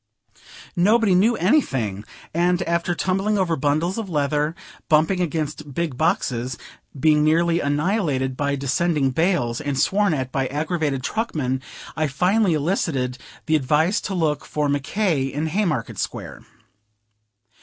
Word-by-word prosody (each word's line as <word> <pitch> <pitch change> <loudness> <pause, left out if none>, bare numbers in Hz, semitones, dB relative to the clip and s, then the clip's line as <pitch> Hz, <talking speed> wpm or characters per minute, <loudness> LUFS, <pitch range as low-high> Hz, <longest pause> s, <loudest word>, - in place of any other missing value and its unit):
Nobody 210 +3 +4
knew 215 +6 +4
anything, 135 - +1 0.3
and 175 +2 +2
after 170 0 0
tumbling 195 +4 0
over 180 -4 +1
bundles 155 - 0
of 210 -4 -5
leather, 150 0 0 0.3
bumping 160 +4 +3
against 155 -4 -3
big 170 -6 -1
boxes, 130 - 0 0.4
being 150 +1 +4
nearly 165 +2 +3
annihilated 145 -4 0
by 140 +1 0
descending 140 +1 +1
bales, 160 -6 0
and 145 -3 -2
sworn 200 +1 +2
at 130 -2 -3
by 135 -1 0
aggravated 150 -2 -2
truckmen, 140 - -2 0.3
I 155 -1 0
finally 180 +6 +2
elicited 140 -6 -1 0.3
the 155 - +2
advice 155 +6 +2
to 195 - -4
look 155 -4 0
for 150 -1 -1
Mc 145 0 0
K. 170 -4 0
in 145 +3 -3
Haymarket 160 - -1
Square. - - -5
155 Hz, 135 wpm, -22 LUFS, 140-180 Hz, 0.4 s, Nobody